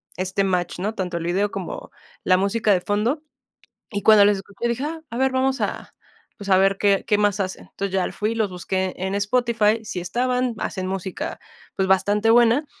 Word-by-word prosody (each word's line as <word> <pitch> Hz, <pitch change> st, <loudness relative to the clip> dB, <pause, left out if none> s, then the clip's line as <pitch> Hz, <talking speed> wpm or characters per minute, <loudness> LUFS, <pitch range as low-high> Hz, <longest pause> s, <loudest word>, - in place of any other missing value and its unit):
este 190 Hz, +2 st, -1 dB
match, 180 Hz, -2 st, -1 dB
¿no? 200 Hz, +5 st, -2 dB
Tanto 180 Hz, -4 st, -3 dB
el 170 Hz, -, -4 dB
video 190 Hz, +4 st, 0 dB
como -, -, -6 dB, 0.3 s
la 185 Hz, 0 st, +4 dB
música 205 Hz, +3 st, +1 dB
de 185 Hz, -3 st, +3 dB
fondo. 225 Hz, -, -1 dB, 0.7 s
Y 205 Hz, -2 st, -2 dB
cuando 210 Hz, 0 st, +7 dB
les 205 Hz, -1 st, +3 dB
escuché 200 Hz, +4 st, -5 dB
dije: 235 Hz, +3 st, -2 dB
"Ah, 320 Hz, +1 st, -5 dB
a 235 Hz, -, -4 dB
ver, 265 Hz, 0 st, +2 dB
vamos 265 Hz, +1 st, 0 dB
a, -, -, -4 dB, 0.4 s
pues, 200 Hz, -2 st, -8 dB
a 190 Hz, -, +6 dB
ver 195 Hz, +1 st, +3 dB
qué 200 Hz, -1 st, +3 dB
qué 210 Hz, -2 st, +2 dB
más 205 Hz, -1 st, +2 dB
hacen". 190 Hz, -1 st, -3 dB
Entonces, 195 Hz, -1 st, -4 dB
ya 190 Hz, -1 st, 0 dB
fui 210 Hz, +1 st, -2 dB
y -, -, -3 dB
los 220 Hz, -3 st, 0 dB
busqué 185 Hz, +1 st, -2 dB
en 190 Hz, +1 st, -3 dB
Spotify, 220 Hz, +1 st, +1 dB
sí 185 Hz, -, -4 dB
estaban, 250 Hz, +6 st, -1 dB
hacen 185 Hz, -3 st, -3 dB
música, 195 Hz, -, -4 dB, 0.4 s
pues, 190 Hz, -1 st, 0 dB
bastante 205 Hz, +3 st, +3 dB
buena. 240 Hz, +5 st, +4 dB
205 Hz, 200 wpm, -22 LUFS, 190-230 Hz, 0.7 s, cuando